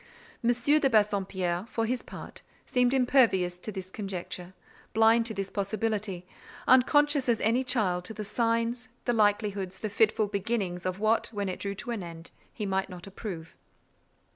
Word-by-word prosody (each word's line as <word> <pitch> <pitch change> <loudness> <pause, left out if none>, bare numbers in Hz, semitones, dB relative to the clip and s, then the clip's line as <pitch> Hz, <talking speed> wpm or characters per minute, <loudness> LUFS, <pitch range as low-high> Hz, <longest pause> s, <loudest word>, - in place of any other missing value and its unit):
M. 230 - +3
de 275 +4 +3
Bassompierre, 195 -4 +1
for 225 - -1
his 245 +2 -1
part, - - -10 0.2
seemed 250 -1 +2
impervious 240 -9 +3
to 215 - -5
this 190 -2 -7
conjecture, 185 -2 -6 0.4
blind 225 +1 +5
to 225 - -4
this 195 0 -3
possibility; 205 -2 -2 0.4
unconscious 285 +1 +4
as 230 -2 +3
any 235 +4 +2
child 205 -9 0
to 220 - -3
the 210 0 -5
signs, 230 +3 0 0.2
the 240 - +2
likelihoods, 205 -3 +1
the 215 +1 -4
fitful 220 0 +3
beginnings 200 -3 -2
of 185 0 -2
what, 220 +2 +2
when 205 -3 -3
it 185 - -4
drew 200 0 -3
to 240 - -5
an 225 -4 -3
end, 170 -1 -8 0.2
he 215 - -4
might 190 0 -1
not 180 -1 -9
approve. 190 -5 -7
210 Hz, 165 wpm, -29 LUFS, 190-235 Hz, 0.4 s, blind